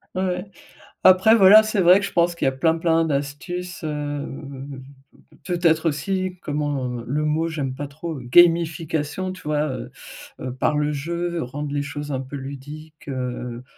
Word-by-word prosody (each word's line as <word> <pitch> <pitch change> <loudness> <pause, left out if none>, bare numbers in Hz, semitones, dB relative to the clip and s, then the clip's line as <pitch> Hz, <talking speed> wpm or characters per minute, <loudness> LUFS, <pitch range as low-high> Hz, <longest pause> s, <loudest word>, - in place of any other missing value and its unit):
Ouais. 185 0 -1 0.6
Après 185 +4 +7
voilà, 210 +1 +8
c'est 215 -1 -1
vrai 180 +2 +6
que 200 - -1
je - - -6
pense 170 0 +2
qu'il - - -5
y - - +5
a - - -4
plein, 160 +5 +1
plein 165 0 +2
d'astuces, 150 +5 -4
heu, - - -1
mmh, 140 -2 -6 0.6
peut 175 -2 -2
peut-être 165 -1 +3
aussi 185 +5 -2
comment, 145 -2 -2 0.2
heu, - - -10
le 150 +4 -1
mot 160 +2 0
j'aime 140 -5 -3
pas 145 +1 -5
trop, 160 +3 -6
heu, - - -8
gamification 165 +3 +2
tu 185 - -12
vois? 150 0 0
Heu 130 -1 -6 0.5
heu, 130 -1 -5
par 150 +3 +1
le 150 0 0
jeu, 170 +3 -3
rendre 145 +3 -5
les 145 - 0
choses 145 0 -5
un 130 - -2
peu 135 +2 -7
ludiques. 145 +3 -9
Heu, 125 -2 -4
150 Hz, 185 wpm, -23 LUFS, 140-175 Hz, 0.6 s, voilà